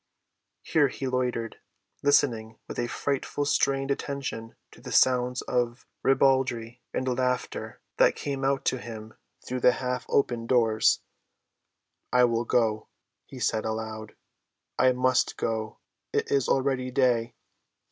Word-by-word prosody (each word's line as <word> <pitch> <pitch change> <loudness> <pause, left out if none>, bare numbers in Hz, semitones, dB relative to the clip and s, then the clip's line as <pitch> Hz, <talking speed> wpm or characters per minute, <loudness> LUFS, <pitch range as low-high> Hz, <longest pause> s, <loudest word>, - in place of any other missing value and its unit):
Here 150 -3 +3
he 135 - -6
loitered, 125 -3 -2 0.4
listening 115 -6 +2
with - - -6
a 120 - 0
frightful, 140 +3 -2
strained 135 -1 +1
attention 135 -5 -4 0.2
to - - -16
the - - -8
sounds 125 -1 +3
of 120 0 -1 0.2
ribaldry 130 -3 +2
and 130 - -2
laughter 125 0 -2 0.2
that - - +5
came 140 -1 -4
out 135 0 +1
to 130 - +1
him 110 -2 -9 0.3
through 125 0 -3
the 125 - +6
half‐open 125 -2 -1
doors. 115 -3 +3 1.1
"I 125 0 +5
will 115 -1 +2
go," 110 -2 +1 0.4
he 130 - -10
said 110 -2 0
aloud. 110 -1 -5 0.6
"I 130 - +5
must 130 0 +1
go. 110 -1 -2 0.3
It - - -1
is 140 -3 +2
already 130 -1 +1
day." 120 -3 +1
125 Hz, 125 wpm, -27 LUFS, 115-135 Hz, 1.1 s, the